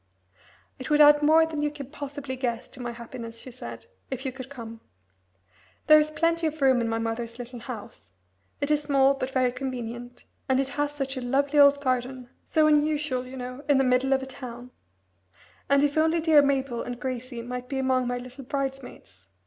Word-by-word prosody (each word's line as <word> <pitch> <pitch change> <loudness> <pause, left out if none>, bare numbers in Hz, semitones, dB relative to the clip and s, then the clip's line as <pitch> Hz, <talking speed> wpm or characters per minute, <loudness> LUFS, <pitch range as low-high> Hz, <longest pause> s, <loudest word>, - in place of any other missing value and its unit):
"It 260 - -6
would 300 0 +3
add 295 0 +8
more 315 +2 +5
than 315 -2 -4
you 295 - +1
can 280 -2 -9
possibly 285 -2 -6
guess 245 -3 -3
to 260 - -15
my 240 -1 -3
happiness," 235 -1 -8
she 255 +3 -10
said, 250 - -9 0.2
"if 265 0 -5
you 265 - -1
could 260 0 -9
come. 230 -4 -9 1.0
There 305 0 +8
is 305 0 +1
plenty 330 +1 +1
of 310 0 -5
room 260 -3 +4
in 230 - -1
my 225 - 0
mother's 230 +1 -3
little 245 0 -8
house. 215 - -9 0.5
It 285 +1 0
is 300 -1 +3
small, 275 -2 +3
but 270 -1 -4
very 255 -2 +1
convenient, 245 -2 -6 0.3
and 260 0 +3
it 270 0 0
has 290 +1 -1
such 270 -2 -4
a - - -3
lovely 280 +4 +1
old 285 0 +6
garden, 255 -1 -2
so 310 -1 +2
unusual, 300 -4 +1
you 260 +1 -9
know, 250 +2 -7
in 285 - +5
the 270 - +4
middle 255 +1 +2
of 265 0 +2
a - - -4
town; 250 -2 -9 1.0
and 280 0 +4
if 290 0 +1
only 320 +1 +3
dear 315 -2 +6
Mabel 275 -4 0
and 245 -1 -6
Gracie 255 -1 -5
might 250 +1 -6
be 270 - -2
among 260 -1 +1
my 245 0 -1
little 250 +2 -9
bridesmaids! 265 - -6
265 Hz, 200 wpm, -26 LUFS, 245-285 Hz, 1.0 s, add